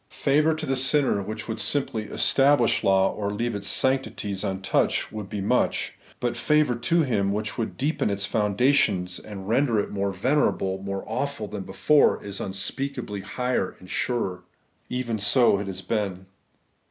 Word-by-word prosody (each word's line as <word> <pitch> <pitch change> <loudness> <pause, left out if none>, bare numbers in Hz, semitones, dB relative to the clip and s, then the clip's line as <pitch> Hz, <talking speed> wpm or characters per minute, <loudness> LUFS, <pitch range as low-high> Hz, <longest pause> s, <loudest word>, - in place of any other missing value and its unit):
Favour 150 +3 +2
to 155 0 -4
the 135 - 0
sinner 130 -4 +2
which 110 +3 -6
would 110 - -4
simplv 115 -7 -1
establish 135 -3 +3
law, 95 0 +3
or 100 -1 -3
leave 115 +3 -2
its 100 -1 -5
sanctities 115 -7 0
untouched, 95 0 0
would 105 -3 -6
be 105 - -4
much; 100 - 0 0.2
but 120 -1 -1
favour 150 -4 +2
to 165 +8 +1
him 100 -8 +1
which 105 +1 -2
would 115 - -4
deepen 145 -3 0
its 100 0 -1
foundations, 105 -4 +1
and 95 -3 -9
render 115 0 +2
it - - -2
more 100 -1 -1
venerable, 95 -3 +1
more 100 0 -4
awful 120 0 -3
than 105 -1 -5
before, 100 +10 +3
is 100 -1 -5
unspeakablv 105 +2 -4
higher 125 -3 -2
and 90 0 -13
surer. 95 -7 -2 0.5
Even 120 -3 -2
so 105 +1 +4
has 95 -2 -4
it 90 - -21
been. 100 -4 -2
110 Hz, 160 wpm, -25 LUFS, 100-130 Hz, 0.5 s, so